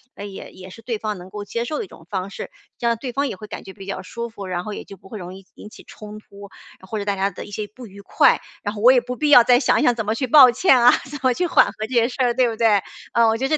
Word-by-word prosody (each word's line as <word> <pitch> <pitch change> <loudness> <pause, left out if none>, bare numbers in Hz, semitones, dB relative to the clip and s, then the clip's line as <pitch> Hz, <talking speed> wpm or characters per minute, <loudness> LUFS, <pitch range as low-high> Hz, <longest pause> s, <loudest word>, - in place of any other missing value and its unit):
呃， 205 - -8
也 195 -1 -9
也 185 0 -12
是 225 - -13
对 230 -1 -3
方 210 -2 -4
能 180 +1 -11
够 205 0 -7
接 235 +3 -3
受 300 +5 -4
的 - - -4
一 - - -16
种 165 - -16
方 190 -1 -3
式， - - -8 0.3
这 235 - -2
样 230 -1 +1
对 245 0 -6
方 280 +1 0
也 190 - -7
会 215 - -10
感 - - -8
觉 190 - -11
比 195 -2 -12
较 195 - -5
舒 235 0 -6
服， 200 -4 -9
然 180 -1 -3
后 210 - -5
也 - - -7
就 195 - -13
不 190 - -18
会 215 - -8
容 180 -1 -8
易 195 -1 -14
引 210 - -12
起 - - -15
冲 210 0 -11
突， 200 -1 -14 0.3
呃， 190 - -15
或 215 - -4
者 200 - -5
大 200 -1 -1
家 195 +1 0
的 185 - -9
一 205 - -13
些 210 0 -5
不 250 -3 -11
愉 200 +1 -13
快。 - - +3 0.2
然 205 0 -3
后 205 - -6
我 250 +3 +7
也 255 - +5
不 250 +1 -6
必 300 +3 -1
要 245 -5 +8
再 245 0 +5
想 260 - +2
想 245 - +3
怎 225 -3 -3
么 215 - 0
去 260 +2 -2
抱 260 -2 +8
歉 260 -2 +3
啊、 245 +1 +7 0.2
怎 290 -1 -7
么 255 -1 +3
去 360 +4 -1
缓 - - +5
和 205 - -6
这 260 - -9
些 235 +1 +3
事 - - -9
儿， 240 -1 +2
对 250 -1 +2
不 225 - -5
对？ 215 -4 +3 0.3
嗯， 235 -1 +4
我 225 - 0
觉 265 +2 -1
得 310 +1 +1
220 Hz, 365 characters per minute, -21 LUFS, 200-245 Hz, 0.3 s, 要